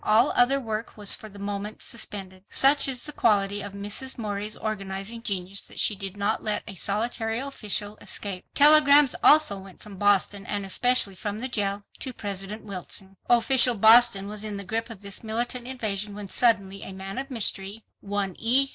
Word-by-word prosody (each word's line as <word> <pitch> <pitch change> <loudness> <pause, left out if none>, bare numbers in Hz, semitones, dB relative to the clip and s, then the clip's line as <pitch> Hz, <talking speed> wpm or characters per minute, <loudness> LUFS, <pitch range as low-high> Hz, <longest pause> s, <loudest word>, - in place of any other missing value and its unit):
All 225 +6 +3
other 265 +3 +3
work 225 -3 -6
was 205 -1 +3
for 215 - -5
the 205 - -15
moment 200 +1 -6
suspended. 190 -4 -4
Such 280 +2 +6
is 255 -3 -1
the 300 - -3
quality 205 -5 +1
of 205 - -8
Mrs. 205 +6 -1
Morey's 210 -1 -4
organizing 200 +1 -5
genius 195 -3 -3
that - - -9
she 210 - +3
did 195 0 -6
not 205 +2 -1
let 215 -1 -1
a 210 - -8
solitary 225 +4 -2
official 215 -6 -2
escape. 190 -3 -2
Telegrams 295 -2 +6
also 295 -10 +5
went 190 -1 -14
from 205 -3 -12
Boston, 205 0 +1
and 205 -1 -3
especially 245 +1 +3
from 205 +2 -6
the 250 +4 -3
jail, 205 -4 -2 0.2
to 260 - -5
President 200 0 -6
Wilson. 195 0 -7
Official 240 +1 +4
Boston 220 -2 +5
was 210 0 -5
in 210 -2 -5
the 200 - -5
grip 225 +4 -4
of 220 -4 -10
this 200 +1 -4
militant 240 +2 -3
invasion 210 -5 -3
when 205 -1 -7
suddenly 200 -5 +2
a 190 - -8
man 195 +3 -7
of 275 +1 -6
mystery, 210 -3 -1
one 200 -2 -4
E. 260 +4 +3
210 Hz, 180 wpm, -25 LUFS, 200-235 Hz, 0.2 s, Such